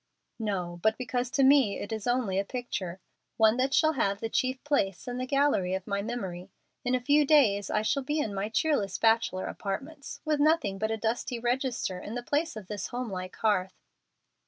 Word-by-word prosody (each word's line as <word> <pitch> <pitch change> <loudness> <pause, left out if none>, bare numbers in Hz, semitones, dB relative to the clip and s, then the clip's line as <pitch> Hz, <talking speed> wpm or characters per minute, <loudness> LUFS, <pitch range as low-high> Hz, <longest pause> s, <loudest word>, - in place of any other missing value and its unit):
"No, 180 -5 -3
but 220 +2 +2
because 250 0 -2
to 275 +1 +2
me 265 -6 +5
it 205 - -6
is 220 -1 -4
only 240 -6 +1
a - - +1
picture 200 -6 -5 0.4
one 220 +1 +5
that 260 +1 +1
shall 315 +2 +4
have 200 -7 0
the 225 - -3
chief 260 0 0
place 195 - 0
in 245 0 -3
the 255 - -3
gallery 275 -10 +2
of 190 -1 -5
my 200 -1 -1
memory. 195 -5 -5 0.3
In 250 0 +1
a - - +1
few 290 +4 +4
days 235 -10 +4
I 215 - +1
shall 275 +6 +1
be 295 +4 -2
in 225 -9 -1
my 200 +2 -2
cheerless 220 -5 0
bachelor 225 -4 +2
apartments, 275 +9 -5
with 305 -1 +1
nothing 305 -10 +2
but 220 +1 0
a 225 - -1
dusty 235 +3 -2
register 240 -5 -1
in 210 +5 -7
the 245 - -4
place 290 +1 -1
of 215 -3 -7
this 205 0 -4
home 245 -2 -4
like 185 -1 -5
hearth." 190 -4 0
225 Hz, 205 wpm, -29 LUFS, 200-265 Hz, 0.4 s, me